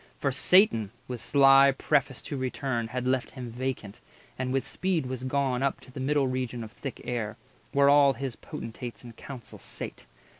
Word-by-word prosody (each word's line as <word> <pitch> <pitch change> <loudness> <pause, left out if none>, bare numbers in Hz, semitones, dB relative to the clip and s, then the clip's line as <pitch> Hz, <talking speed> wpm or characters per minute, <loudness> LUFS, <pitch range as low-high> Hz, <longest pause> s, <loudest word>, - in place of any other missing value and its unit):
For 140 - 0
Satan, 130 - +4 0.2
with 125 -3 -5
sly 135 -1 +6
preface 140 -3 +1
to 145 - -5
return, 130 -2 -2
Had 125 +2 -3
left 130 -1 +1
him 125 -3 -7
vacant, 125 -4 -4 0.4
and 130 0 -2
with 135 -1 0
speed 185 -6 -1
was 130 0 -5
gone 130 -1 0
Up 140 0 0
to 130 - -15
the 130 - -8
middle 140 +1 +2
region 125 -2 -2
of 110 - -9
thick 135 +3 -7
air, 115 -3 -3 0.3
Where 140 0 +4
all 140 -1 +6
his 130 -1 -4
Potentates 115 +2 -8
in 120 -1 -10
council 125 +1 -10
sate. - - -8
130 Hz, 180 wpm, -28 LUFS, 120-140 Hz, 0.4 s, sly